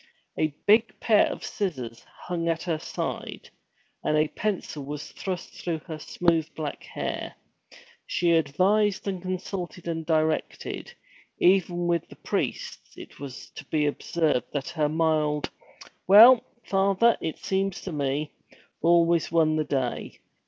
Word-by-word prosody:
A 155 - +2 0.2
big 215 0 +4
pair 215 -3 +4
of - - -6
scissors 130 - -4 0.2
hung 170 -2 -2
at 165 -1 -1
her 165 -3 -1
side, - - -5 0.5
and 155 - +2
a 150 0 +2
pencil 185 -5 -3
was 145 +1 -6
thrust 185 -3 -5
through 170 -2 -3
her 160 -3 -6
smooth 165 0 +1
black 150 -2 -4
hair. - - -5 0.7
She 175 -1 +1
advised 185 +7 +2
and 190 -2 -2
consulted 185 -1 -5
and 165 -1 -2
directed; 155 -1 -1 0.5
even 175 -1 +3
with 170 -1 0
the - - -12
priests - - -4
it - - -12
was 135 -3 -8
to - - -9
be 150 +1 0
observed 150 -1 0
that 145 +2 -2
her 155 -3 0
mild, 155 -2 +1 0.6
'Well, 225 +6 +9 0.2
Father, 195 +4 +3
it 160 - -3
seems 195 -1 -1
to 185 - -6
me,' 145 0 -1 0.5
always 170 0 +3
won 160 -2 +3
the 155 - +1
day. 130 -4 -2
165 Hz, 140 wpm, -26 LUFS, 155-185 Hz, 0.7 s, Well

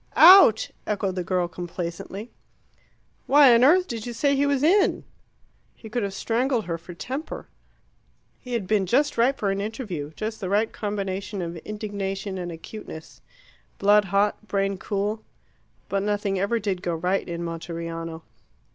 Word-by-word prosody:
"Out," 335 - +8 0.2
echoed 200 -2 -1
the 180 -1 -3
girl 180 0 0
complacently. 175 +4 -6 1.0
"Why 280 -3 +7
on 235 +1 +5
earth 360 +7 +5
did 230 -1 -5
you 240 - -4
say 280 +5 +2
he 285 +1 +2
was 280 -1 +1
in?" 380 +5 +3 0.7
He 220 - -12
could 240 +1 -1
have 200 -1 -3
strangled 240 +2 0
her 165 -1 -3
for 170 +1 -11
temper. 260 - -6 0.9
He 250 - -8
had 230 -5 -1
been 200 -1 +1
just 275 +10 +2
ripe 250 +4 +2
for 200 -2 0
an 195 0 -2
interview 200 - -5
just 220 +1 -4
the 190 -4 -4
right 210 +3 +1
combination 200 -1 -4
of 170 0 -5
indignation 200 -1 -4
and 175 -1 -4
acuteness: 165 -1 -10 0.6
blood 205 +1 +4
hot, 200 +3 0
brain 195 -1 -1
cool. 210 +2 -2 0.6
But 195 +1 -1
nothing 205 -1 -1
ever 200 +5 +1
did 195 -4 -2
go 175 -2 -2
right 180 +3 -1
in 170 0 -4
Monteriano. 165 -1 -5
200 Hz, 155 wpm, -25 LUFS, 180-230 Hz, 1.0 s, Out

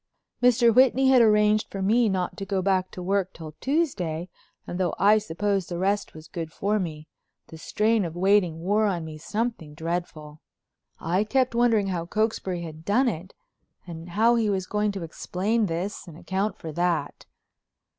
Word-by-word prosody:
Mr. 245 -1 +5
Whitney 260 +2 +5
had 260 -2 +6
arranged 210 -1 +4
for 195 - -6
me 225 +3 +3
not 185 -2 -2
to - - -5
go 195 -1 -1
back 185 -1 +1
to 180 - -8
work 195 0 0
till 160 -2 -9
Tuesday 185 - -1 0.4
and 175 - -5
though 180 -3 0
I 210 +2 +5
suppose 200 0 -2
the 175 - -4
rest 200 +1 -1
was 155 0 -11
good 165 -1 -6
for 210 +5 0
me, 155 -4 -5 0.4
the 160 - -11
strain 215 +5 +1
of 165 -2 -5
waiting 180 -3 +2
wore 210 +4 +2
on 175 -5 -2
me 155 -1 -8
something 210 -5 -3
dreadful. 160 -2 -5 0.6
I 180 +5 0
kept 255 +3 +1
wondering 230 -4 +2
how 170 -2 -3
Cokesbury 195 -4 -1
had 160 -1 -9
done 240 +9 +2
it, 185 -4 -4 0.5
and 170 -1 -9
how 225 +6 +3
he 220 -2 +1
was 190 -2 -1
going 210 +1 0
to 195 -3 -5
explain 200 +7 -1
this 180 +4 -4
and 165 -2 -11
account 195 +3 -2
for 160 - -7
that. 170 -2 -2
190 Hz, 175 wpm, -25 LUFS, 170-215 Hz, 0.6 s, had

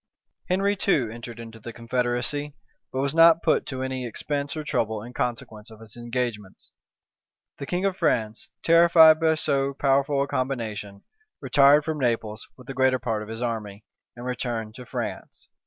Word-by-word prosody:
Henry 195 +3 +1
too 140 - +1
entered 115 0 -9
into 115 -1 -10
the 115 +2 -8
confederacy; 120 +5 -2 0.4
but 130 - -2
was 140 0 0
not 165 0 +6
put 160 - +2
to 130 -1 -4
any 130 -1 -3
expense 140 +5 -3
or 155 - -3
trouble 110 -6 -2
in 120 +2 -10
consequence 115 -3 -4
of 110 -1 -14
his 110 -2 -10
engagements. 120 -4 -5 0.9
The 140 - -6
king 180 +2 -1
of 195 -2 0
France, 115 - -1
terrified 165 -1 +7
by 160 -1 +3
so 140 -3 0
powerful 140 0 +2
a - - -4
combination, 110 -7 -4 0.4
retired 145 +1 +5
from 155 -1 -3
Naples 115 -4 -2
with 125 - -14
the 135 - -6
greater 130 -1 +2
part 115 -3 -2
of 105 - -8
his 115 +2 -5
army, 110 -3 -4 0.3
and 120 +1 -9
returned 120 -3 -3
to 125 0 -11
France. - - -6
125 Hz, 170 wpm, -25 LUFS, 115-145 Hz, 0.9 s, terrified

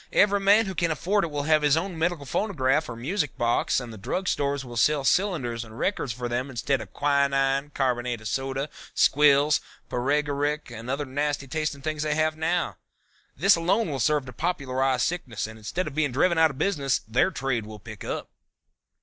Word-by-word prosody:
Every 205 0 +4
man 200 +3 +5
who 190 - -4
can 170 -2 0
afford 190 +6 +1
it 170 - -1
will 145 -1 -3
have 155 0 +3
his 150 0 +3
own 180 +2 -2
medical 165 -2 -1
phonograph 150 -5 0
or 115 - -5
music 150 - -2
box, 120 +2 +1
and 120 -3 -8
the 110 - -10
drug 160 - -3
stores 140 -1 0
will 120 -1 -9
sell 145 +4 +3
cylinders 135 - +1
and 110 0 -12
records 185 -8 -1
for 120 +1 -4
them 125 +3 -2
instead 135 +2 -1
of - - -10
quinine, 140 -1 +1
carbonate 125 -3 0
of 110 - -7
soda, 135 +5 -2 0.3
squills, 145 +1 +4 0.3
paregoric 145 +2 0
and 115 +1 -8
other 140 +2 -1
nasty 145 +1 -2
tasting 150 0 -3
things 155 0 -2
they 150 -1 0
have 155 0 +1
now. 165 +2 -1 0.6
This 195 +8 +5
alone 180 +3 +1
will 135 - -3
serve 150 +1 +2
to 125 - -9
popularize 135 -6 0
sickness 150 -11 -2
and 110 0 -9
instead 175 - -3
of 150 - -6
being 150 -2 0
driven 165 +6 +2
out 160 0 +6
of 140 - -9
business 140 -8 0
their 125 +11 +3
trade 125 - -2
will 110 0 -8
pick 105 0 -10
up." - - -5
140 Hz, 195 wpm, -26 LUFS, 130-160 Hz, 0.6 s, out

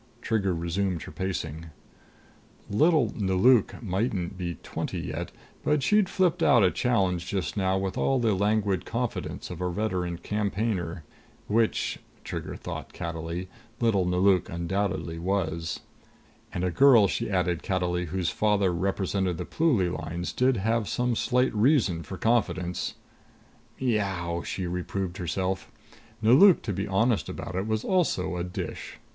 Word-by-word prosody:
Trigger 105 -6 0
resumed 85 +1 -1
her - - -9
pacing. 85 -4 -4 1.0
Little 145 0 +3
Nelauk 105 +5 +3
mightn't 95 -2 -1
be 90 -2 -4
twenty - - -4
yet, - - -4 0.3
but 150 -2 +2
she'd 210 +4 +3
flipped 185 -3 +1
out 120 - +5
a 90 - +4
challenge 95 -8 +1
just 95 -2 -2
now 95 -2 +1
with 95 0 -2
all 135 - +2
the 115 -4 +2
languid 100 -1 +1
confidence 120 -4 -4
of 90 0 -7
a 90 - 0
veteran 90 -3 -2
campaigner. 100 -3 -2 0.4
Which, 110 +1 +1 0.2
Trigger - - -5
thought - - -7
cattily, 85 +1 -4 0.3
little 110 -6 +2
Nelauk 90 0 +3
undoubtedly 85 -1 -2
was. 85 -3 -2 0.7
And 90 - -3
a 90 - +1
girl, 120 -2 +6
she 115 +4 -2
added 90 -3 0
cattily, 90 -1 -1
whose 90 +1 -1
father 100 -4 +2
represented 95 0 -1
the - - -4
Pluly 120 - +2
Lines 85 +2 -4
did 125 -1 +2
have 110 +2 0
some 125 -1 0
slight 125 +3 +1
reason 105 - +3
for 95 +4 -7
confidence.... 90 -6 0 0.8
"Miaow!" 95 -8 -1
she 95 - -3
reproved 90 +1 -3
herself. 95 +1 -2 0.5
Nelauk, 145 - +7
to 105 - -2
be 100 +3 -2
honest 110 +3 +1
about - - -6
it, 95 +3 -1
was 110 0 -1
also 165 - +1
a 85 - -2
dish. 90 0 -6
95 Hz, 140 wpm, -27 LUFS, 90-110 Hz, 1.0 s, Nelauk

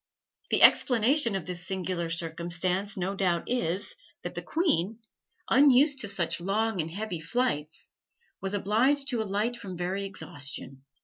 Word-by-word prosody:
The - - +3
explanation 245 -1 +4
of 190 -4 -3
this 180 0 -4
singular 185 -3 -2
circumstance 170 +4 -1
no 190 +1 -2
doubt 180 -4 0
is, 200 - 0 0.3
that - - -5
the - - -5
queen, 225 - 0 0.5
unused 280 +1 +5
to 220 - -2
such 170 -4 -1
long 205 +1 0
and 160 - -5
heavy 185 -1 -4
flights, 160 -5 -2 0.5
was 195 +1 -2
obliged 255 +8 +2
to 240 -3 0
alight 215 +4 -1
from 190 -6 -8
very 185 +3 -2
exhaustion. 140 -7 -5
195 Hz, 140 wpm, -28 LUFS, 170-230 Hz, 0.5 s, unused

